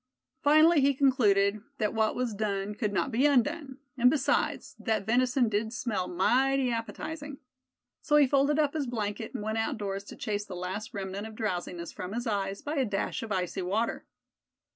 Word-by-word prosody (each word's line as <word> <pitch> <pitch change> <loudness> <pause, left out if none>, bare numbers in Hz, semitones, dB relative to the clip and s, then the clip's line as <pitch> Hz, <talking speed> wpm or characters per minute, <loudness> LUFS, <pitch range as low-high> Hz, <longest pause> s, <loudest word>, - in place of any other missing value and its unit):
Finally 310 +2 +6
he 275 0 +3
concluded 215 -7 +3 0.2
that 215 - 0
what 220 -1 +1
was 250 -3 -1
done 200 -1 -2
could 210 -1 -2
not 235 +7 0
be 255 +5 +3
undone; 285 +1 +1 0.2
and 250 +1 +6
besides, 275 -1 0
that 220 -3 -1
venison 250 +2 +2
did 215 +1 -1
smell 220 -6 -2
mighty 255 +8 +2
appetizing. 290 +5 -5 0.6
So 295 - +1
he 295 -1 +7
folded 280 +2 +2
up 295 -2 +2
his 300 -4 -2
blanket, 220 -1 -4
and - - -3
went 220 +1 -1
outdoors 200 -3 -2
to - - -10
chase 205 -1 -2
the 200 -3 -8
last 190 +6 -5
remnant 195 +2 -4
of 220 - -11
drowsiness 175 -5 -3
from 185 +2 -6
his 240 +1 -3
eyes 200 -2 -2
by 300 +1 -3
a 265 - +2
dash 200 -3 -2
of 225 - -6
icy 185 -2 -1
water. 205 +6 -1
225 Hz, 180 wpm, -29 LUFS, 200-270 Hz, 0.6 s, he